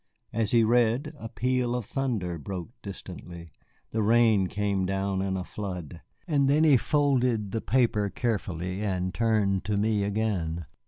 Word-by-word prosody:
As 115 -2 0
he 115 -1 +4
read 120 +6 +2
a 115 - -6
peal 125 0 0
of 125 -4 -3
thunder 105 - -2
broke 90 +6 -6
distantly, 85 -4 -9 0.4
the 110 - 0
rain 110 -3 +4
came 100 -1 -1
down 95 0 -1
in 95 -1 -1
a 90 - -3
flood. 90 -5 -6 0.3
Then 145 -1 +3
he 150 -3 +6
folded 125 -6 +1
the 115 - -2
paper 115 -5 +2
carefully 95 -5 -2
and 95 -3 -1
turned 105 -4 +1
to 105 -1 0
me 105 0 +1
again. 100 -6 -1
105 Hz, 150 wpm, -27 LUFS, 95-120 Hz, 0.4 s, he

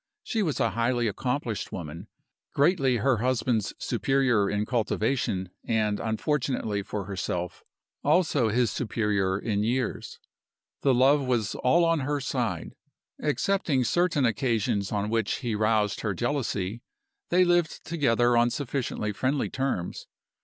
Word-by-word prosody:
She 225 - -1
was 160 -8 -1
a 115 - +2
highly 120 +1 +1
accomplished 120 +1 -2
woman, 85 +3 -7 0.5
greatly 140 -5 +3
her 130 +1 +2
husband's 120 -2 0
superior 130 -7 +1
in 105 +1 0
cultivation, 110 -5 -1
and, 105 -2 0
unfortunately 115 -2 -1
for 100 0 -5
herself, 90 -3 -4 0.4
also 150 -6 +3
his 120 0 +2
superior 105 -5 0
in 105 -1 -1
years. 125 +3 -2 0.6
The 135 -2 +3
love 135 +2 +4
was 115 -5 0
all 170 +7 +3
on 165 -1 +2
her 145 +1 -1
side. 135 - -2 0.5
Excepting 150 -2 +1
certain 165 0 +2
occasions 110 -3 0
on 105 0 -1
which 115 -3 +1
he 120 -4 -2
roused 105 -1 +1
her 105 -3 -1
jealousy, 115 -3 -2 0.5
they 180 +1 +4
lived 175 -2 +1
together 120 -7 +2
on 120 0 +4
sufficiently 125 -5 -2
friendly 130 +6 -1
terms. 130 -10 -3
120 Hz, 130 wpm, -27 LUFS, 105-140 Hz, 0.6 s, love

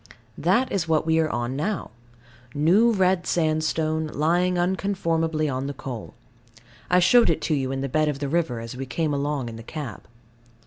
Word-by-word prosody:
That 255 +2 +2
is 175 -4 -1
what 155 -1 +2
we 160 0 +2
are 160 -1 +1
on 120 -1 -2
now. 195 - -2 0.6
New 185 +11 +4
red 190 -3 +1
sandstone, 155 -1 0
lying 175 +5 +1
unconformably 170 -4 0
on 130 0 -2
the 140 - -5
coal. 125 -5 -7 0.7
I 180 - +4
showed 230 +7 +5
it 155 -2 0
you 135 -3 0
in 135 0 -3
the 135 - -1
bed 155 +3 +1
of 145 - -2
the 140 0 -3
river, 145 -6 0
as 115 +2 -7
we 135 +1 -5
came 150 +4 -1
along 140 -2 -1
in 115 -1 -7
the - - -8
cab. 135 0 -7
155 Hz, 180 wpm, -24 LUFS, 140-175 Hz, 0.7 s, showed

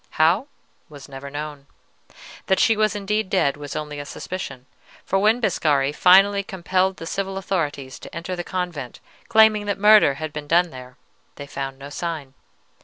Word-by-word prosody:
How, 175 - +3 0.4
was 145 -3 -12
never 140 0 -9
known. 145 -1 -7 0.8
That 190 - +2
she 225 - +4
was 215 0 +1
indeed 210 0 -1
dead 180 -8 +2
was 145 -1 -8
only 150 -1 -5
a 145 - -6
suspicion, 180 -9 -7 0.4
for 195 - +1
when 215 +4 +3
Biscari 150 - +1
finally 195 +4 +5
compelled 190 0 -1
the 165 - -8
civil 195 +3 -3
authorities 145 -9 -3
to - - -11
enter 170 +2 -4
the 175 - -4
convent, 175 -9 -5 0.3
claiming 220 -2 +5
that 200 - -1
murder 210 -8 +6
had 155 +1 -6
been 150 -1 -6
done 175 +2 +3
there, 125 -1 -11 0.4
they 145 - -8
found 135 -1 -5
no 140 +1 -10
sign. 155 -4 -5
170 Hz, 170 wpm, -22 LUFS, 145-195 Hz, 0.8 s, murder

